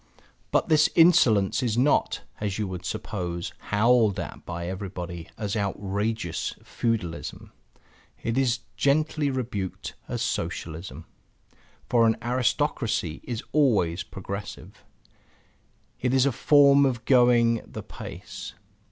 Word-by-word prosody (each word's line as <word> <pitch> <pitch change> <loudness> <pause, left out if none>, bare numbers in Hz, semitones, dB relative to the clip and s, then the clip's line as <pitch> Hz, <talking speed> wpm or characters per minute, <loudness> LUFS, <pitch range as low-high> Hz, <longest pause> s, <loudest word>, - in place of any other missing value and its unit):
But - - +2
this 155 0 +4
insolence 125 - +5
is 120 -3 0
not 135 +4 +2 0.2
(as 105 -2 -2
you 105 -2 -1
would 90 -1 -6
suppose) 85 -2 -4
howled 110 -1 +3
at - - -7
by 85 -1 -4
everybody 90 -2 -6
as 105 -1 -3
outrageous 100 -1 -2
feudalism. 105 -8 -3 0.7
It 115 - -1
is 125 -2 +1
gently 150 +1 +1
rebuked 115 -8 -4
as - - -2
Socialism. 80 -1 -4 0.8
For 115 -2 +4
an 110 - +2
aristocracy 125 - 0
is 120 -2 -4
always 100 - +2
progressive; 100 +2 -8 1.2
it 125 +1 +1
is 130 0 +4
a 140 - +3
form 140 +2 +5
of 125 -3 0
going 120 -3 +4
the - - -8
pace. - - -9
115 Hz, 115 wpm, -26 LUFS, 95-130 Hz, 1.2 s, insolence